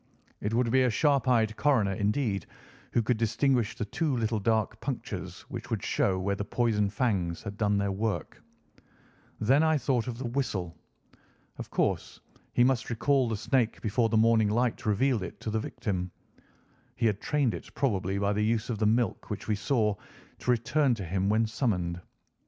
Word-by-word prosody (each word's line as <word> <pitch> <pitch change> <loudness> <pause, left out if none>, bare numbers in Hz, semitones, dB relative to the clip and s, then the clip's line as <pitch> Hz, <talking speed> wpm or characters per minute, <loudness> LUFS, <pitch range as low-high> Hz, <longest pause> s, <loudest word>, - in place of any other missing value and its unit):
It 105 - -1
would 120 -1 +2
be 130 +1 +4
a 130 - +3
sharp 140 +2 +2
eyed 110 -3 +3
coroner, 115 -9 +2
indeed, 105 -1 -1 0.5
who 115 - +3
could 120 +1 +1
distinguish 115 0 +1
the 105 - -2
two 145 +4 -1
little 110 -1 0
dark 110 0 0
punctures - - -5
which - - -8
would - - -2
show 95 -1 +1
where 100 +2 -1
the 100 - -3
poison 105 -1 +1
fangs 100 -6 -1
had 100 - -6
done 105 -1 +1
their 100 0 0
work. 105 +2 -3 1.0
Then 135 +7 +4
I 160 -1 +3
thought 130 -4 0
of 120 -2 -4
the 130 - -5
whistle. 105 -9 -2 0.8
Of - - -6
course - - -1 0.3
he 120 - +4
must 130 -1 +1
recall 130 +2 +2
the 110 - -1
snake 120 +1 0
before 115 +1 +1
the 110 - +2
morning 110 -1 +4
light 120 +1 0
revealed 115 +2 +2
it 90 - -7
to 110 - -3
the 110 - 0
victim. 95 -4 -3 0.9
He 120 - -1
had 105 -2 +1
trained 145 -7 +1
it, 85 - -8
probably 100 -8 0
by 100 +1 +1
the 105 +1 0
use 115 +2 0
of 110 - -3
the 110 - +3
milk 115 +2 0
which 105 -2 -5
we 110 - +2
saw, 105 0 +1 0.5
to - - -5
return 125 +3 +2
to 100 -4 -6
him 95 +3 0
when 110 +2 +3
summoned. 90 -7 -1
110 Hz, 185 wpm, -29 LUFS, 100-125 Hz, 1.0 s, be